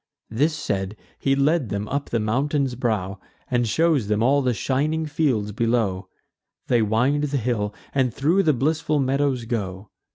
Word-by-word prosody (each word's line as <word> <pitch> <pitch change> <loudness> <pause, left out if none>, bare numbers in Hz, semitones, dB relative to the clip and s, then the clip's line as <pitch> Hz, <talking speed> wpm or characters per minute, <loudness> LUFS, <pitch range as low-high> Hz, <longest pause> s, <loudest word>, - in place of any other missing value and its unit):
This 150 +8 +1
said, 100 -8 -3 0.2
he 135 0 +2
led 140 -2 +2
them 100 +1 -3
up 140 +1 -3
the 115 - 0
mountain's 135 +5 0
brow, 105 -6 -2 0.3
And 120 -1 +2
shews 150 -1 +2
them 105 +1 +1
all 140 +3 +4
the 130 -2 +1
shining 150 +8 0
fields 140 -9 0
below. 105 -4 0 0.6
They 120 -2 +2
wind 125 +8 +2
the 145 -1 -1
hill, 110 -4 -1 0.2
and 130 -3 +2
thro' 160 - +2
the 160 -5 +3
blissful 155 +3 0
meadows 135 -2 0
go. 100 -4 -4
125 Hz, 160 wpm, -23 LUFS, 110-145 Hz, 0.6 s, all